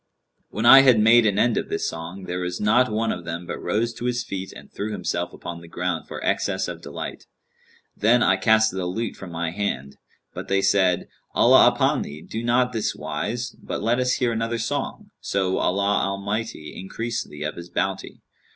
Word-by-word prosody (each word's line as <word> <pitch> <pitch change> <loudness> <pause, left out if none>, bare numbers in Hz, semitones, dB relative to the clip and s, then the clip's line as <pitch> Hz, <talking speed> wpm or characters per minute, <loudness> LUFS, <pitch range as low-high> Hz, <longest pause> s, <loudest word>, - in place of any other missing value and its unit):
When 110 - -3
I 135 +3 +10
had 125 -5 +5
made 115 +1 +6
an 100 -1 +1
end 115 +2 +3
of - - -2
this - - -1
song, 85 +4 -6
there 90 0 -4
was 90 0 -3
not 110 +4 +3
one 110 +1 0
of 90 - -5
them 85 +1 -5
but - - -5
rose 110 +6 0
to 120 - -7
his 120 -1 0
feet 95 -4 -5
and - - -13
threw 105 +2 -4
himself 90 -4 -2
upon 85 -1 -8
the 85 - -12
ground 90 0 -3
for - - -6
excess - - 0
of - - -7
delight. - - -7 0.7
Then 120 +3 +4
I 95 - +4
cast 110 +2 +4
the 95 -1 -3
lute 115 +6 -3
from 95 - -9
my 85 0 -2
hand, 75 -9 -3 0.4
but - - -7
they 95 0 +1
said, 95 -3 +2 0.3
'Allah - - +7
upon - - +2
thee, 75 +2 -7
do 110 +1 -5
not 125 +1 +2
on - - -15
this 110 -2 -1
wise, 120 +1 -3
but - - -5
let 120 +3 +2
us 125 0 +2
hear 125 -2 +1
another 115 +1 -1
song, 115 +1 -4
so 95 -1 -1
Allah 100 +2 +1
Almighty 100 -4 -3
increase 115 +5 -4
thee 75 0 -9
of 75 - -3
His 85 0 -9
bounty!' 95 +2 -3
100 Hz, 205 wpm, -23 LUFS, 90-115 Hz, 0.7 s, I